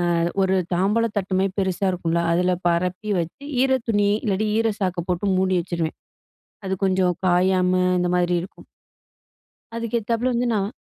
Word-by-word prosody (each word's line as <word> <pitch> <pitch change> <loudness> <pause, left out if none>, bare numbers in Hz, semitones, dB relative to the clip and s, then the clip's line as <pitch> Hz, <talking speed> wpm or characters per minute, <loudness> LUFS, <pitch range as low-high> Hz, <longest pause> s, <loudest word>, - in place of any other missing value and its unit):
அ - - +1 0.2
ஒரு 190 0 +2 0.2
தாம்பலத்தட்டுமாரி 195 -1 0
பெருசா 190 0 -1
இருக்கும்ல, 170 -1 -1
அதுல 180 +1 +2
பரப்பி 180 +4 -1
வச்சு, 170 +12 -5 0.2
ஈர 265 0 +3
துணி, 205 -2 +2
இல்லாட்டி 210 +1 0
ஈர 225 0 +2
சாக்க 185 -3 -1
போட்டு 180 +3 -1
மூடி 185 -1 +2
வச்சுருவேன். 170 -2 -3 0.7
அது 190 - 0
கொஞ்சம் 185 -2 +2
காயாம 180 +1 +3 0.3
இந்த 180 - 0
மாரி 175 0 +1
இருக்கும். 185 - -12 1.1
அதுக்கு 230 0 -1
ஏத்தாப்புல 235 +3 -1
வந்து, 245 +1 0
நான் 205 +3 -2
190 Hz, 145 wpm, -22 LUFS, 180-210 Hz, 1.1 s, ஈர